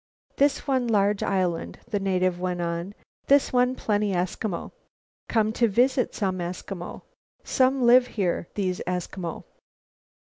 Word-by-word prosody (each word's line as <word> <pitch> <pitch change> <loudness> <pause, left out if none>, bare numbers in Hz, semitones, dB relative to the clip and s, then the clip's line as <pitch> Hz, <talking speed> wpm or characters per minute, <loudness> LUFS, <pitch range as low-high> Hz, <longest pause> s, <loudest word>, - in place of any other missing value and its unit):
"This 280 0 +2
one 260 -4 +1
large 205 -2 +2
island," 185 -4 -1
the 215 -4 -1
native 185 -2 0
went 180 -1 -2
on, 170 +3 -3 0.3
"this 280 -1 +4
one 250 +1 +3
plenty 205 -3 0
Eskimo. 180 +1 -2 0.6
Come 220 -2 +2
to 235 +1 +3
visit 250 +4 +2
some 190 -3 -1
Eskimo. 175 +1 -6 0.4
Some 260 0 +2
live 245 +1 +6
here, 180 -7 -1
these 185 -3 -1
Eskimo. 180 -1 -4
200 Hz, 130 wpm, -25 LUFS, 180-245 Hz, 0.6 s, live